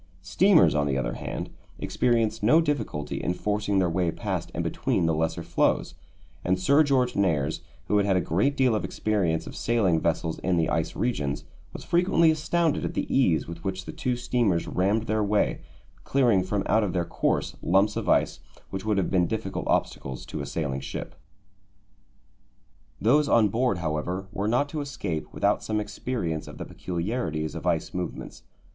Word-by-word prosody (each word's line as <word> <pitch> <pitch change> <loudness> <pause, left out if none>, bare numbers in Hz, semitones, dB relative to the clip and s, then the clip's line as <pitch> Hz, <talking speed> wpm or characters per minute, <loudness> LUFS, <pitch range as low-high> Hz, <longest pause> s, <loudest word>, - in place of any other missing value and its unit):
Steamers, - - +5
on 75 -1 +1
the 65 -1 0
other 65 -3 -1
hand, - - -5 0.3
experience 115 -3 0
no 120 +10 +5
difficulty 145 - -2
in 90 - -1
forcing 105 0 -1
their 95 -2 +3
way 85 0 0
past - - -3
and - - -1
between - - 0
the 80 - +2
lesser 80 +1 -1
floes, - - +1 0.5
and 90 +1 +1
Sir 140 +11 +4
George 130 -4 +2
Nares, 80 -7 +1 0.2
who 105 - +2
had 100 0 +2
had 95 - +3
a - - +3
great 100 - 0
deal 130 -3 +3
of 110 - 0
experience 95 -7 0
of - - -9
sailing 100 -8 +2
vessels 80 0 -1
in 90 -2 0
the 80 -1 +1
ice 80 0 -1
regions, 90 - -1 0.3
was - - -8
frequently 170 -2 +3
astounded 160 +1 0
at - - -3
the - - -1
ease 90 -13 +3
with 85 0 -8
which 95 -1 -3
the - - -6
two 125 -1 -2
steamers 120 -8 0
rammed 100 +4 +1
their 110 -1 0
way, 105 0 +1 0.4
clearing 120 -8 +3
from 95 +2 -1
out 110 +1 +3
of 95 - -2
their 90 -2 0
course - - -1
lumps 100 +4 +3
of - - -2
ice - - +2 0.3
which 95 0 -4
would 105 -1 0
have 95 - 0
been 90 -2 +3
difficult - - -3
obstacles 65 -1 -1
to - - -5
a - - -5
sailing 70 -4 -2
ship. 70 - -6 1.9
Those 145 +7 +3
on 110 -3 +5
board, 120 -1 +1
however, 85 +4 -3
were 100 +2 -2
not 125 +6 +2
to 155 -1 -3
escape 100 - -4
without - - +1
some 110 -1 -1
experience 105 -6 -3
of - - -10
the - - -6
peculiarities 85 -4 -3
of 85 +2 -5
ice 85 -2 0
movements. 90 -1 -5
95 Hz, 180 wpm, -26 LUFS, 85-120 Hz, 1.9 s, Steamers